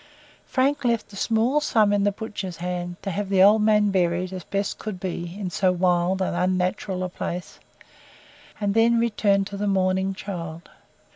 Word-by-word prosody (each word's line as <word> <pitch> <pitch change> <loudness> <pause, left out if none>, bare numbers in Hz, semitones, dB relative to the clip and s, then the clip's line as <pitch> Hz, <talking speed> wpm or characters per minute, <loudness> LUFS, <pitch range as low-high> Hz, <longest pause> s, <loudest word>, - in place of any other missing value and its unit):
Frank 275 +2 +1
left 235 -4 0
a - - -9
small 230 +7 +2
sum 215 -7 +3
in 200 0 +2
the 205 - +3
butcher's 200 -4 -6
hands, 175 0 -4
to 195 - -2
have 200 +2 -3
the 190 -1 +5
old 210 +2 +6
man 210 -1 +3
buried, 180 0 0
as 185 -2 -6
best 200 +2 -3
could 210 -4 -5
be, 175 0 -5
in 185 -3 -4
so 185 +1 +2
wild 180 +1 +1
and 185 - -2
unnatural 185 +1 -1
a 180 - -2
place, 175 0 -6 1.0
and 205 -1 0
then 230 +2 +4
returned 205 -4 +2
to 200 - -7
the 205 +1 -2
mourning 190 0 +1
child. 170 -4 -7
195 Hz, 175 wpm, -24 LUFS, 180-210 Hz, 1.0 s, old